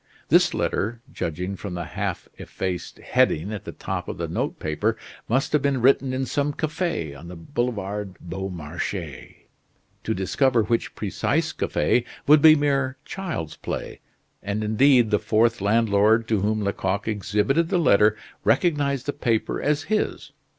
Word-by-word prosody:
This - - +4
letter, 115 +4 -1
judging 90 +4 -3
from 95 -1 -6
the 85 - -3
half - - -4
effaced 90 -2 -4
heading 90 +8 +1
at 105 - -6
the - - -5
top - - -5
of - - -5
the - - -3
note - - -2
paper, 75 -1 -1 0.3
must 130 +6 +1
have 150 - +4
been 140 -2 +1
written 135 +1 +3
in 130 +1 -1
some 145 +3 -1
cafe 150 - -2
on 70 +4 -11
the 90 - -8
Boulevard 105 - -3
Beaumarchais. 85 -4 -6 0.6
To - - -1
discover 115 +6 +2
which 115 +2 -1
precise - - -1
cafe 115 +11 +1 0.2
would 150 +1 +6
be 155 0 +9
mere 140 -3 0
child's 160 - -5
play; - - -5 0.4
and 105 +2 -2
indeed 120 +2 +4
the 105 - +3
fourth 115 0 +2
landlord 110 +1 +3
to 110 -4 +2
whom 105 +1 0
Lecoq 100 +1 -1
exhibited 105 - +1
the - - +2
letter 105 -9 +4 0.3
recognized 145 -6 +1
the 145 - -2
paper 115 -6 -1
as 145 0 +1
his. 215 0 -2
110 Hz, 150 wpm, -24 LUFS, 95-135 Hz, 0.6 s, be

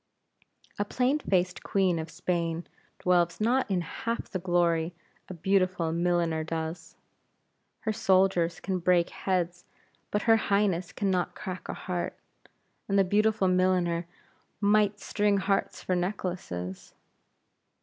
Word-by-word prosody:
A - - +3
plain 255 +7 +1
faced 185 -7 0
Queen 185 -4 +1
of 160 0 -5
Spain 170 -1 -2 0.3
dwells 175 -2 +2
not 240 +3 +2
in 185 -3 +1
half 230 +7 -4
the 185 - -2
glory 170 -2 +1 0.3
a 185 - -6
beautiful 185 -2 +1
milliner 170 -1 +1
does. 160 +1 -5 0.9
Her 220 - -1
soldiers 190 -5 +2
can 190 0 -2
break 175 0 +3
heads, 180 -2 -1 0.5
but 210 - -1
her 225 -1 +5
Highness 200 -5 +1
can 200 -2 -1
not 180 -1 0
crack 185 -3 -6
a - - -3
heart; 175 -1 -4 0.7
and 200 - +2
the 195 - +6
beautiful 205 +1 +2
milliner 180 -2 +2 0.5
might 205 0 +3
string 205 0 +1
hearts 195 0 -1
for 185 - 0
necklaces. 175 - -4
185 Hz, 130 wpm, -28 LUFS, 170-200 Hz, 0.9 s, the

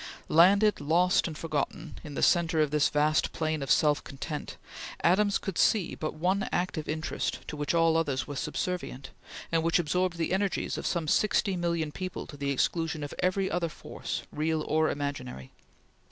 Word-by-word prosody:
Landed, 200 +4 +5
lost, 175 +6 +3
and 155 -2 -6
forgotten, 160 +2 -3
in 150 -3 -8
the - - -1
centre 170 -2 +3
of 150 -2 +2
this 150 -1 +3
vast 150 +1 +2
plain 155 -2 -1
of 135 - -4
self 150 -1 +3
content, 145 +2 -6 0.5
Adams 200 +3 +4
could 195 -4 -4
see 205 -6 +3
but 155 - -4
one 185 +5 0
active 175 -3 -2
interest, 155 +1 -3
to - - -5
which 145 +3 -1
all 165 -1 +4
others 145 -5 0
were 145 - -6
subservient, 150 -3 -4 0.4
and 165 -1 +2
which 165 +1 +2
absorbed 175 +1 0
the 165 +1 -1
energies 195 0 0
of - - -3
some 170 -3 -1
sixty 200 +2 +2
million 170 -3 -1
people 185 +4 -5
to - - -11
the 140 0 -3
exclusion 160 +3 0
of 145 - -6
every 190 +1 +1
other 170 -1 0
force, - - -6
real 155 +1 -1
or 155 0 +2
imaginary. 135 - -5
160 Hz, 175 wpm, -29 LUFS, 150-180 Hz, 0.5 s, Landed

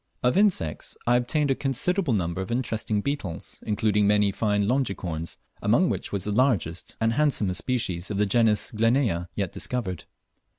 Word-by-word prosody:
Of 125 +4 +3
insects 185 - +1
I 120 - +4
obtained 140 +4 +1
a - - +5
considerable 140 +4 0
number 85 -1 -1
of 95 - -5
interesting 110 -3 -1
beetles, 100 - -4
including 105 -1 +2
many 105 -1 +3
fine 105 -1 0
longicorns, 95 - -2 0.2
among - - +3
which - - -4
was 100 -3 -2
the 105 - -2
largest 105 - 0
and 115 0 +2
handsomest 115 -10 +1
species 95 -8 -2
of 105 - -3
the 105 - +3
genus 110 0 +2
Glenea 115 -6 +1
yet 100 -4 -2
discovered. 95 -9 -4
105 Hz, 160 wpm, -26 LUFS, 95-125 Hz, 0.2 s, a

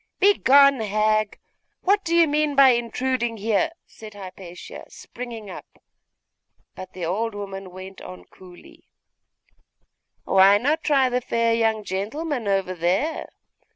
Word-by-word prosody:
'Begone, 280 -9 +5
hag! 215 0 0 0.5
What 400 +2 +2
do 335 0 -1
you 335 -1 +5
mean 300 0 0
by 275 -1 +7
intruding 240 0 -1
here?' 220 +8 0 0.2
said 215 -2 -13
Hypatia, 185 -2 -10
springing 235 -3 -9
up; - - -12 1.0
but 185 0 -10
the 180 -2 -5
old 210 +6 -2
woman 195 -2 -7
went 185 +1 -11
on 90 -1 -11
coolly 180 - -17 1.4
'Why 195 +1 +5
not 295 +8 -1
try 275 -4 +3
the 250 0 -1
fair 230 -1 0
young 225 -2 0
gentleman 225 - -4
over 195 -2 0
there? 185 - -1
220 Hz, 125 wpm, -23 LUFS, 195-270 Hz, 1.4 s, by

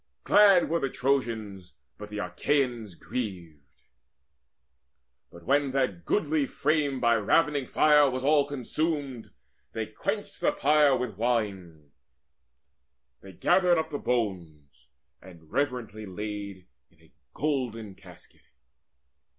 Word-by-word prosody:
Glad 200 -4 +5
were 170 +1 0
the 135 - -1
Trojans, 115 -9 -2 0.3
but 105 0 -8
the 105 - -7
Achaeans 115 - -1
grieved. 90 - -6 1.7
But 85 - -14
when 140 +4 +2
that 115 -11 -1
goodly 155 -6 0
frame 145 -3 0
by 120 -1 +3
ravening 140 +5 +1
fire 150 -2 +4
Was 130 0 -4
all 145 0 +4
consumed, 145 -2 -3 0.4
they - - -3
quenched - - -5
the - - +2
pyre 145 -2 +3
with 120 -6 -5
wine; 95 -10 -2 1.3
They 95 -1 -12
gathered 180 - +3
up 160 0 -2
the 145 - -3
bones, 90 - -4 0.3
and 85 -4 -16
reverently 120 -6 -3
Laid 100 -1 -6 0.2
in - - -30
a - - -24 0.2
golden 125 -8 -2
casket. - - -17
125 Hz, 115 wpm, -27 LUFS, 100-145 Hz, 1.7 s, Glad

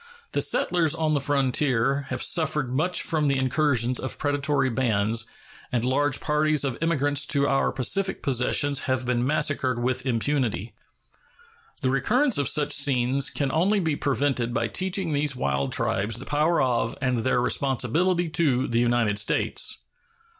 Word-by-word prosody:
The - - 0
settlers 170 -3 +1
on 160 -2 0
the 145 - +1
frontier 135 -1 0
have 130 -1 -2
suffered 150 -6 0
much 175 +7 +1
from 155 -3 0
the 140 -1 +1
incursions 130 -2 +1
of 130 - -4
predatory 145 -2 0
bands, 115 -2 0 0.4
and 120 -1 -1
large 140 +2 +1
parties 150 -1 +1
of 135 -4 -1
emigrants 145 -3 +1
to 140 -1 +2
our 135 -1 +1
Pacific 190 - -1
possessions 135 +2 +1
have 130 -1 0
been 120 -1 0
massacred 140 -2 0
with 130 0 -1
impunity. 120 -3 -1 1.1
The 130 - +1
recurrence 225 - +1
of 140 - +1
such 145 -1 0
scenes 135 -2 +2
can 140 -2 -2
only 190 +7 +2
be 160 -5 -1
prevented 135 -4 -1
by - - -1
teaching 185 -3 -1
these 145 -1 0
wild 70 - -2
tribes 105 +3 -1
the 130 - -8
power 155 +3 +1
of 120 -3 0
and 125 -2 0
their 120 +2 +1
responsibility 140 +8 0
to 140 -6 +1
the 115 0 0
United 120 -3 +1
States. 105 - 0
135 Hz, 155 wpm, -24 LUFS, 125-150 Hz, 1.1 s, to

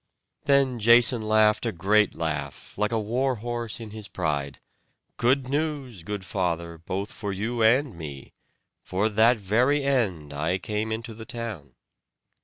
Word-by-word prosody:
Then 135 -3 +3
Jason 120 +2 +5
laughed 110 0 +3
a 115 - 0
great 105 +4 +2
laugh, 75 -4 -4
like 105 +1 0
a 115 - +1
war 125 +5 0
horse 120 0 -4
in 110 -2 -8
his 105 -1 -7
pride: 75 -7 -2 0.6
"Good 130 +2 +2
news, 140 - -2
good 100 +2 -5
father, 85 -3 -2
both 95 +5 -4
for 100 -2 -5
you 115 +5 -2
and 125 +2 +3
me. 75 -5 -9 0.5
For 100 +4 0
that 110 +3 +4
very 120 +8 +2
end 100 - 0
I 80 +6 0
came 105 +2 -3
into 115 +1 -4
the 110 +1 -10
town." 105 - -6
110 Hz, 150 wpm, -26 LUFS, 95-120 Hz, 0.6 s, Jason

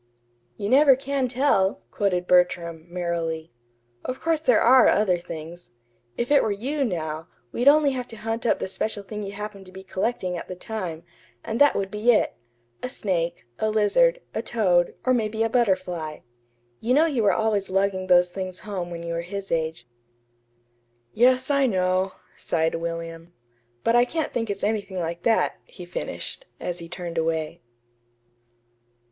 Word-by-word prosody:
"'You 200 - -3
never 275 +3 +6
can 270 0 -1
tell,'" 240 - +1
quoted 180 -3 0
Bertram, 175 -2 +2
merrily. 170 -2 -3 0.5
"Of 255 - -4
course 325 -1 +1
there 250 -8 +4
ARE 255 +1 +6
other 190 -4 +3
things. 170 +1 -9 0.5
If 240 +3 -2
it 285 - +6
were - - 0
you, 270 +8 -1
now, 160 -7 -3 0.2
we'd 245 - -1
only 290 0 +6
have 250 -2 -4
to 225 - -10
hunt 225 +2 -3
up - - +3
the - - -3
special 205 +2 -3
thing 210 +2 -6
you 200 -1 -5
happened 200 -2 -7
to - - -13
be 190 0 -10
collecting 190 -1 -2
at 170 - -6
the 185 - -6
time, 180 -5 -5 0.4
and 225 +4 -3
that 290 - +6
would 195 -1 -2
be 215 +3 +3
it: - - +2 0.5
a 250 - -3
snake, 180 -9 -2
a 220 - +1
lizard, - - +3
a - - -1
toad, 180 -7 +2
or 255 - +4
maybe 220 -2 0
a 225 - +1
butterfly. 180 -9 0 0.6
You 245 +3 +1
know 310 +3 +5
you 280 -8 0
were 205 -2 +4
always 210 -1 0
lugging 190 0 0
those 180 -1 +5
things 185 -1 -5
home 190 -4 -4
when 170 -1 -6
you 170 0 -3
were 170 - -1
his 195 +3 -6
age." 160 -6 -2 1.3
"Yes, 255 +4 +3
I 280 -1 +3
know," 185 -2 +1 0.2
sighed 160 -1 0
William. 165 0 -5 0.5
"But 230 - +3
I 240 0 +6
can't 320 +4 -3
think 230 -2 -1
it's 200 -1 -3
anything 205 -3 -1
like 170 0 -3
that," 225 +2 +2
he - - -11
finished, - - -6
as 175 0 -4
he 165 -1 -9
turned 175 -2 -4
away. 160 +1 -2
195 Hz, 170 wpm, -25 LUFS, 175-240 Hz, 1.3 s, never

